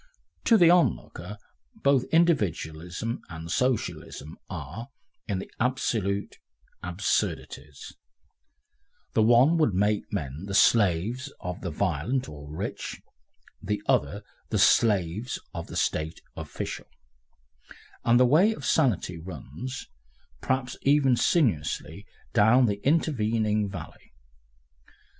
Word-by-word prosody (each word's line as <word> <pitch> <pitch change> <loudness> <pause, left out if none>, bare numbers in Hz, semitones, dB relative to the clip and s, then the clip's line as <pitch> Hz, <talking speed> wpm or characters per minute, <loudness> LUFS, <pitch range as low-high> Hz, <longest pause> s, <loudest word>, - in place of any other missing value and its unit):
To 230 - +6
the 170 -4 +6
onlooker, 105 - 0 0.4
both 140 - +2
Individualism 105 - 0
and 80 0 -7
Socialism 110 - -2
are, 115 +2 -7 0.4
in 100 -3 -1
the 95 - -7
absolute, 110 -5 -1 0.4
absurdities; 85 -5 -3 1.2
the - - +3
one 120 +9 +5
would 115 - +2
make 105 +2 0
men 80 -3 -4
the 100 - -3
slaves 110 - +3
of 90 0 -6
the 90 - -3
violent 95 - -1
or 75 -1 -10
rich, 90 +6 -5 0.6
the 105 +1 -2
other - - +1 0.3
the - - 0
slaves 105 +1 +2 0.2
of - - -6
the - - -6
State 80 +1 -1 0.2
official, - - -6 1.2
and 120 +1 +4
the 125 - +6
way 170 - +4
of - - -8
sanity 105 - +1
runs, 85 - -7 0.5
perhaps 130 -1 -1
even 140 -2 +4
sinuously, 100 - 0 0.3
down 115 +4 +5
the 100 -2 -2
intervening 110 -9 +1
valley. 95 -2 -10
105 Hz, 105 wpm, -27 LUFS, 90-130 Hz, 1.2 s, To